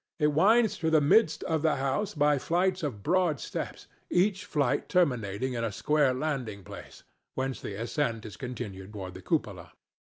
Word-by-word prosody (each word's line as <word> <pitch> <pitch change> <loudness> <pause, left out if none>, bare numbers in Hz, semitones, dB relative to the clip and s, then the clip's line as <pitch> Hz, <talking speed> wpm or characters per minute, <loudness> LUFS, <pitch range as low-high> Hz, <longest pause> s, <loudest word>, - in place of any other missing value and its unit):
It 150 -2 +2
winds 215 +6 +4
through 160 - +1
the 160 -1 +5
midst 155 +2 +3
of 160 -2 0
the 160 -1 +2
house 140 +10 -1
by 145 -1 +3
flights 180 +6 +1
of 125 -10 -4
broad 175 -4 +2
steps, - - -5 0.2
each 185 0 +1
flight 140 -3 0
terminating 125 - +1
in 115 -1 -2
a 115 - -1
square 150 +5 +2
landing 130 -7 -3
place, - - -11 0.3
whence 130 0 -2
the 100 - -5
ascent 115 +1 -2
is 105 -4 -8
continued 110 -6 -7
toward 95 -3 -6
the 95 - -10
cupola. - - -2
145 Hz, 170 wpm, -29 LUFS, 115-165 Hz, 0.3 s, the